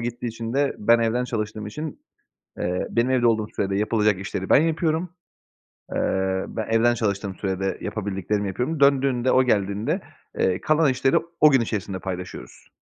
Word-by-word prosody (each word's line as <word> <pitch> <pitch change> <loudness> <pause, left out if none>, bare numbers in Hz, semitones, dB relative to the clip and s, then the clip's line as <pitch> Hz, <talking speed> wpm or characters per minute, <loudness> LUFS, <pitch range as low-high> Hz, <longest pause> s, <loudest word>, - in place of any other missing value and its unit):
gittiği 120 +1 -4
için 115 0 -5
de 140 +1 +1
ben 115 +3 +4
evden 115 +2 +1
çalıştığım 110 -3 -4
için, 150 +8 -6 0.6
eee, 90 +1 -1
benim 120 +2 +1
evde 125 -2 +3
olduğum 110 -2 +2
sürede 95 0 0
yapılacak 105 -2 +2
işleri 95 -1 -5
ben 145 - +6
yapıyorum. 165 +1 0 0.9
Iıı, 95 0 0
ben 110 -2 -4
evden 115 +2 +4
çalıştığım 100 -4 -2
sürede 95 -1 -2
yapabildiklerimi 100 0 -2
yapıyorum. 125 - -2
Döndüğünde, 135 -3 +3
o 130 - +5
geldiğinde, 100 -3 0 0.4
eee, 95 -1 +1
kalan 155 -2 +3
işleri 130 +1 +2 0.2
o 150 -1 +8
gün 135 -3 +4
içerisinde 100 -4 -3
paylaşıyoruz. 90 -1 -7
115 Hz, 155 wpm, -24 LUFS, 100-130 Hz, 0.9 s, o